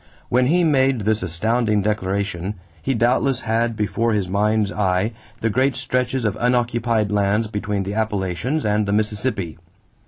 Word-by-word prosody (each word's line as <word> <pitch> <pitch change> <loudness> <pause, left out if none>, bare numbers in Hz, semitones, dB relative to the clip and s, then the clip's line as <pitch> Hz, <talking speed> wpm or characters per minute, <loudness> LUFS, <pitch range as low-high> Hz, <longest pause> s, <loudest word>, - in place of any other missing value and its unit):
When 125 +1 +3
he 175 +5 +3
made 135 -6 +3
this 110 +1 +1
astounding 105 +4 0
declaration, 100 -2 -2 0.3
he 135 +6 0
doubtless 125 +3 +2
had 115 0 0
before 110 +2 0
his 100 -3 0
mind's 105 +2 +1
eye 95 +1 +1 0.3
the 115 - +1
great 130 +4 +2
stretches 125 -1 -1
of 105 -2 0
unoccupied 120 -3 +1
lands 105 +2 +2
between 105 -1 -2
the 100 +2 -4
Appalachians 110 - -1
and 105 0 +1
the 100 - 0
Mississippi. 105 -5 -1
110 Hz, 150 wpm, -21 LUFS, 100-120 Hz, 0.3 s, When